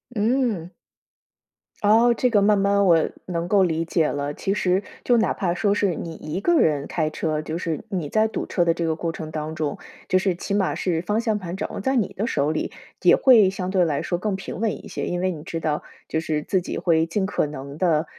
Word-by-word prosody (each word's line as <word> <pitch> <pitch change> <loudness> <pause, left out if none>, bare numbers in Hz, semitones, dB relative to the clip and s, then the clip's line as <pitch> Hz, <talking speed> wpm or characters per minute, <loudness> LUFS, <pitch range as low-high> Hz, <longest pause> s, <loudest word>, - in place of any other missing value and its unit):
嗯。 215 -6 0 1.1
哦， 225 +3 +5
这 250 - +2
个 205 -4 +3
慢 205 -1 +4
慢 200 0 +3
我 165 -3 +4 0.2
能 170 -1 -3
够 195 +1 +4
理 165 -2 0
解 165 -1 +1
了， 145 0 -2
其 195 - -1
实， 190 -1 +1 0.2
就 245 - +3
哪 225 - +2
怕 180 -3 -1
说 200 +3 +1
是 200 -4 +1
你 165 +1 -6
一 155 +2 -5
个 340 - +3
人 145 -3 +2
开 155 -2 -1
车， 155 -1 -2
就 155 +1 -4
是 165 -2 -3
你 180 -7 -2
在 215 +8 +2
堵 220 - -4
车 175 - +1
的 170 - +3
这 170 0 -2
个 160 -1 0
过 165 +1 -2
程 155 -1 -7
当 155 0 -4
中， 155 -3 -2 0.3
就 185 - +3
是 185 -1 0
起 195 - -4
码 200 -2 +1
是 170 -3 -1
方 210 +5 0
向 220 -3 0
盘 180 -1 -6
掌 - - -4
握 - - -4
在 265 +5 0
你 225 -7 +1
的 215 +4 -2
手 145 -6 +1
里， 155 - -2 0.3
也 - - +6
会 230 -8 +6
相 185 -1 -4
对 185 -2 +3
来 150 -4 0
说 175 - -1
更 205 +1 -1
平 195 +1 -7
稳 220 -2 -2
一 - - -9
些。 - - -4
因 175 0 -2
为 185 0 +1
你 155 - -7
知 165 +1 -5
道， 150 -2 -1 0.3
就 160 - -1
是 155 -2 -2
自 190 - 0
己 - - -5
会 165 -2 +2
尽 190 +4 -1
可 190 -5 0
能 140 0 -8
地 165 -4 +2
180 Hz, 255 characters per minute, -23 LUFS, 160-205 Hz, 1.1 s, 也